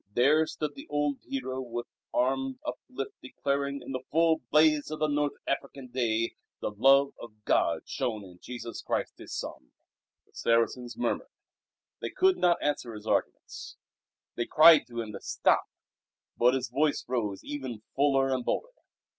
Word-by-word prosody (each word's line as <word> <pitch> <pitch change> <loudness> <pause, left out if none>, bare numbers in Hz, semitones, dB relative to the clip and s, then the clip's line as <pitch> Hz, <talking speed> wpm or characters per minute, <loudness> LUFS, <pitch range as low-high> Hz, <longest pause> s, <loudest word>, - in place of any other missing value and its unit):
There 150 +6 +4
stood 150 -2 -4
the - - -11
old 145 -1 0
hero 130 - -3
with 120 -1 -5 0.3
arm 135 +1 0
uplifted 135 +1 -6
declaring, 140 +1 -2
in - - -7
the 130 -1 -3
full 160 0 +3
blaze 150 -1 +4
of 155 - -4
the 155 - +1
North 145 -1 +1
African 135 -1 -3
day, 115 -2 0 0.3
the - - -2
Love 135 +6 +5
of 105 -2 -12
God - - +2
shown 110 -4 -2
in 90 -2 -14
Jesus 120 -2 -7
Christ - - -2
His - - -10
Son. 60 - -6 0.5
The - - -33
Saracens 115 +1 +1
murmured. 245 - -1 0.7
They - - -3
could 375 0 +3
not 175 -1 +4
answer 125 -6 -1
his 105 0 -10
arguments. - - -2 0.6
They 120 - -2
cried 155 0 +7
to 120 -1 -4
him 110 -2 -6
to 100 - -8
stop, - - +2 0.7
but 125 +2 +4
his 130 -1 -2
voice 150 +1 +1
rose 110 -6 -2
ever 135 -5 -4 0.2
fuller 135 -1 +3
and 130 -1 -1
bolder. - - -2
135 Hz, 160 wpm, -29 LUFS, 120-145 Hz, 0.7 s, cried